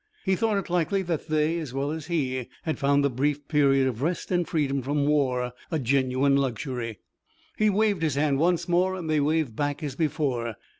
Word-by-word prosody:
He 190 -1 +3
thought 220 0 +1
it 195 - -3
likely 180 +3 0
that 170 -4 -3
they, 155 +1 +1
as 140 -6 -6
well 140 +2 -1
as 160 -1 -5
he, 130 -7 -1 0.2
had 160 - -2
found 140 0 +3
the - - +3
brief 145 +3 -1
period 140 -3 +3
of 125 -2 -3
rest 170 +6 -2
and 175 -2 +1
freedom 140 -4 0
from 140 +2 0
war 130 -4 +1 0.2
a 160 - 0
genuine 135 +1 +2
luxury. 125 -4 -2 0.6
He 215 0 +3
waved 205 -2 +1
his 155 -4 0
hand 140 -1 +1
once 175 +3 +2
more, 180 +2 +2
and 175 -3 -5
they 155 -1 +2
waved 150 -5 0
back 145 +3 -2
as 140 -3 -4
before. 135 -7 -1
145 Hz, 200 wpm, -26 LUFS, 135-165 Hz, 0.6 s, He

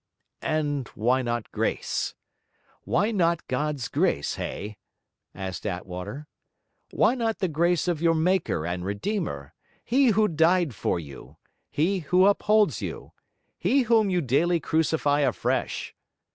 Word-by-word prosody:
'And 145 -4 -1
why 125 +4 +2
not 120 -2 -3
Grace? - - -2 0.7
Why 205 +6 +1
not 170 -5 +1
God's 145 0 -2
Grace, 70 - 0
Hay?' 105 0 -5 0.6
asked 95 -2 -5
Attwater. 95 +8 -5 0.6
'Why - - +3
not 230 -3 -1
the 190 - 0
grace 170 +2 +1
of 170 -3 0
your 165 -1 +3
Maker 160 - +1
and 90 +1 -3
Redeemer, 100 - -3 0.3
He 265 +3 +3
who 215 -1 +4
died 165 - +2
for 90 - -1
you, 70 -4 -11 0.3
He 185 +6 +1
who 180 +3 +3
upholds 210 +1 +3
you, - - -6 0.5
He 275 -1 +3
whom 225 -3 +3
you 180 -2 +1
daily 165 +6 +2
crucify 155 -2 +1
afresh? 145 - -1
160 Hz, 130 wpm, -26 LUFS, 120-185 Hz, 0.7 s, who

